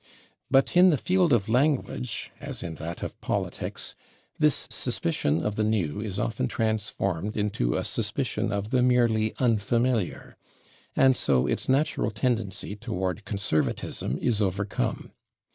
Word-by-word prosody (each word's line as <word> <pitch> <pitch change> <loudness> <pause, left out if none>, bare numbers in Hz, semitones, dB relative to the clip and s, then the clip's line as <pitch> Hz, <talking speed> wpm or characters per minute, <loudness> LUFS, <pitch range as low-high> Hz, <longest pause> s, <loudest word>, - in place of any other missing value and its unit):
But 135 +4 +3
in 180 +1 +8
the 155 - +3
field 180 +2 +2
of 115 -6 +3
language, 125 - 0
as - - -6
in 85 - -4
that 85 +1 -5
of - - -6
politics, - - -3 0.5
this 150 -3 +2
suspicion 75 +3 0
of 105 0 -1
the 110 - +2
new 105 -5 0
is 100 -3 -4
often 115 +4 -1
transformed 105 -4 -1
into 100 - 0
a - - 0
suspicion - - -1
of 100 +2 -2
the 125 - +3
merely 120 -3 +3
unfamiliar, 115 -2 0 0.6
and 130 -1 +5
so 65 - +2
its - - -1
natural 140 -3 +2
tendency 110 -3 -2
toward 95 -1 -3
conservatism 100 - -1
is 110 -3 0
overcome. 100 0 -1
110 Hz, 135 wpm, -27 LUFS, 100-125 Hz, 0.6 s, in